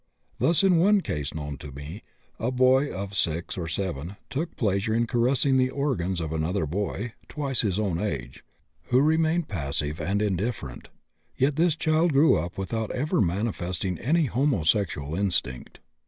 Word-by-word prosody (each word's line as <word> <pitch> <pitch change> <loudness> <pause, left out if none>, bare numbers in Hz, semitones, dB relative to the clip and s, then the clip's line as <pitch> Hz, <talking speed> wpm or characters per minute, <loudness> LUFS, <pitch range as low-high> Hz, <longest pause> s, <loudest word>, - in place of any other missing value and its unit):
Thus, 170 +3 +3
in 185 -3 +5
one 200 +3 +4
case 75 - -3
known 75 -2 -5
to 75 0 -9
me, 70 - -8 0.4
a 115 - 0
boy 130 +2 +3
of 100 +1 -5
6 85 -2 -1
or 85 -3 -4
7 85 0 -3 0.2
took 160 +5 -3
pleasure 105 0 0
in 115 +1 +2
caressing 130 +3 +2
the 130 0 +3
organs 125 - -1
of 80 -1 -3
another 80 +3 0
boy, 105 +7 -3 0.2
twice 140 -4 0
his 100 -4 0
own 95 -6 0
age, 70 - -4 0.4
who 125 +6 +3
remained 160 +2 +2
passive 75 -2 -2
and 95 +6 0
indifferent; 100 - -3 0.5
yet 135 +2 +2
this 165 0 +3
child 160 0 +2
grew 145 +4 +5
up 85 +3 -3
without 110 +3 -2
ever 140 -1 +1
manifesting 90 -2 -1
any 160 +6 +2
homosexual 100 - 0
instinct. 90 -10 -2
105 Hz, 155 wpm, -26 LUFS, 85-135 Hz, 0.5 s, in